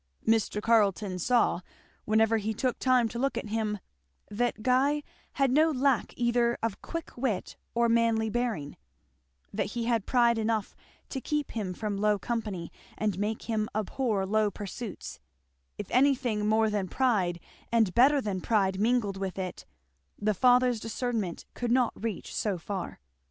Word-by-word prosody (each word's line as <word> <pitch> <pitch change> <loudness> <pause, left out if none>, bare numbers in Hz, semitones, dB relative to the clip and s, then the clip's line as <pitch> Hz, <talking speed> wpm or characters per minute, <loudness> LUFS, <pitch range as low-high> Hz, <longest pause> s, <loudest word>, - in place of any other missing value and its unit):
Mr. 220 -2 +2
Carleton 205 -4 +2
saw, 235 -2 +2 0.4
whenever 220 +1 +3
he 220 +1 -2
took 255 +2 -1
time 255 -3 +3
to 235 +2 -6
look 275 +2 0
at 215 - -4
him, 215 -1 -1 0.5
that 225 0 -1
Guy 275 +4 +2 0.3
had 275 -2 +2
no 310 +4 +5
lack 270 -4 +1
either 240 0 +2
of 230 -3 -2
quick 330 -1 -6
wit 240 -6 -2 0.2
or 235 0 +3
manly 230 -1 +2
bearing; 220 -10 -2 0.8
that - - -1
he 230 - -1
had 230 -3 0
pride 235 -2 +3
enough 220 -2 -1 0.3
to 265 - -4
keep 300 0 -2
him 195 -5 -3
from 210 -1 -3
low 210 0 +2
company 210 -6 -4 0.3
and 210 -4 -1
make 215 +2 -2
him 220 -2 -1
abhor 215 -1 0
low 215 +1 +2
pursuits; 205 - -7 0.6
if - - -4
anything 255 -5 +2
more 220 0 +3
than 205 -3 -1
pride 190 -8 +1 0.3
and 225 -6 +3
better 275 +4 +5
than 200 -7 -3
pride 195 -3 +1
mingled 220 -3 +1
with 195 -1 -4
it, 185 -2 -5 0.5
the 215 +1 +1
father's 250 +2 +4
discernment 225 -5 -3
could 240 -1 -2
not 250 -1 +3
reach 220 -4 -5
so 205 -4 0
far. 185 +1 -5
225 Hz, 155 wpm, -29 LUFS, 205-245 Hz, 0.8 s, no